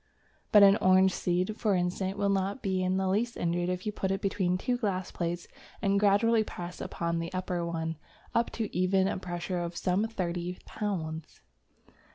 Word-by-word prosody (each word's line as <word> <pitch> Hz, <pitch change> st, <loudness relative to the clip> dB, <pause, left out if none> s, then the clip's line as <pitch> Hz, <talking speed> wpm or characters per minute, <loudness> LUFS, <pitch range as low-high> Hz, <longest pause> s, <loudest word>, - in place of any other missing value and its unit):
But 210 Hz, -1 st, +8 dB
an 200 Hz, +1 st, +7 dB
orange 185 Hz, -1 st, +5 dB
seed, 180 Hz, +4 st, -1 dB
for 210 Hz, -4 st, +2 dB
instance, 185 Hz, +2 st, -1 dB
will 200 Hz, 0 st, +1 dB
not 200 Hz, +5 st, 0 dB
be 190 Hz, -2 st, 0 dB
in 185 Hz, 0 st, +1 dB
the 190 Hz, 0 st, 0 dB
least 220 Hz, +5 st, 0 dB
injured 175 Hz, +1 st, 0 dB
if 180 Hz, 0 st, -3 dB
you 210 Hz, -, 0 dB
put 190 Hz, -2 st, -2 dB
it 195 Hz, 0 st, 0 dB
between 185 Hz, -2 st, 0 dB
two 245 Hz, +6 st, 0 dB
glass 195 Hz, -6 st, -2 dB
plates 170 Hz, 0 st, -3 dB, 0.3 s
and 200 Hz, -1 st, +2 dB
gradually 215 Hz, +3 st, +4 dB
press 175 Hz, -3 st, -7 dB
upon 170 Hz, 0 st, -2 dB
the 165 Hz, 0 st, -4 dB
upper 180 Hz, -1 st, -2 dB
one 165 Hz, -1 st, -3 dB, 0.4 s
up 230 Hz, 0 st, +2 dB
to 220 Hz, -3 st, -4 dB
even 190 Hz, +1 st, +3 dB
a 195 Hz, -, -2 dB
pressure 180 Hz, 0 st, -3 dB
of 170 Hz, 0 st, -4 dB
some 185 Hz, +6 st, +1 dB
thirty 180 Hz, -4 st, -3 dB
pounds. 160 Hz, -7 st, -4 dB
185 Hz, 185 wpm, -29 LUFS, 175-200 Hz, 0.4 s, But